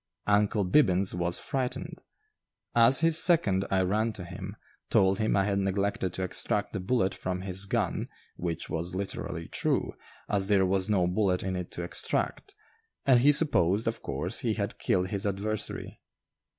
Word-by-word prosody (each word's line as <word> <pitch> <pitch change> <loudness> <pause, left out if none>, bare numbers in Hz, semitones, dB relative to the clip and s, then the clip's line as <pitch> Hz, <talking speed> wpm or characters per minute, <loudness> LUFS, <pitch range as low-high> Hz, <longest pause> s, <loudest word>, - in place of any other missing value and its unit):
"Uncle 105 0 +2
Bibbins" 95 -4 +3
was 85 0 -1
frightened. 130 -3 -4 0.7
As 120 +4 +5
his 165 0 +6
second, 100 - +2
I 95 -1 +2
ran 110 +4 0
to 95 - -6
him, - - -8 0.3
told 95 0 +3
him 110 -2 +1
I 100 - +3
had 100 -1 0
neglected 95 -1 -1
to 95 - -3
extract 105 +2 -1
the 100 - -2
bullet 95 -1 0
from 90 0 -4
his 95 0 -1
gun 100 - -2 0.3
(which 85 -2 -3
was 85 +3 -4
literally 95 +1 -5
true, - - -1 0.3
as 100 -2 0
there 100 -2 +3
was 95 +1 0
no 95 -4 +2
bullet 90 0 0
in 95 0 -2
it 90 -1 -5
to 85 - -4
extract), 85 - -2 0.5
and 130 -3 +5
he 140 +4 +5
supposed, 110 - +2
of 115 - -2
course, - - -3
he - - -1
had - - -4
killed 90 0 0
his 100 +1 -2
adversary. 100 +2 -4
100 Hz, 165 wpm, -28 LUFS, 95-110 Hz, 0.7 s, his